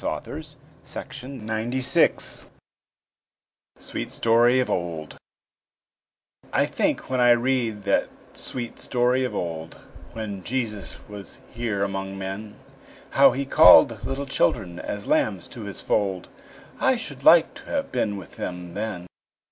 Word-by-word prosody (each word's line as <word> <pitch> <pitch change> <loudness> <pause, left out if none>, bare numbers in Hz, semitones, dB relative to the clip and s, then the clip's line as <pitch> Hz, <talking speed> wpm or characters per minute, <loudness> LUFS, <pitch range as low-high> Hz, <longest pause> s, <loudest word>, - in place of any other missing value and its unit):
WILLIAM - - -4 0.4
SHAKESPEARE 125 0 -1 1.3
SWEET - - -5
STORY 120 +2 +4
OF 130 - +1
OLD 85 -3 -3 1.3
I - - +3
think - - -1
when 130 - +1
I 120 0 +5
read 120 -3 +2
that 100 - +1 0.2
sweet 120 -2 -5
story 125 +1 +1
of 125 - -3
old, 80 -2 -4 0.4
When 105 -4 -5
Jesus 110 -4 -3
was 105 -1 -9
here 115 -4 -2
among 95 0 -3
men, 100 +2 -6 0.6
How - - +6
He 140 +2 -2
call'd 130 -6 +7
little 135 +3 -3
children 100 -9 0
as 100 0 -5
lambs 95 -5 +1
to 115 -4 -8
His 100 - -6
fold, 95 -4 -1 0.5
I 265 -1 +3
should 145 - -6
like 165 +2 +7
to - - -13
have 280 -1 -2
been 105 -5 -1
with 90 -6 -11
them 90 -1 -5
then. 100 -3 -4
110 Hz, 125 wpm, -24 LUFS, 95-125 Hz, 1.3 s, call'd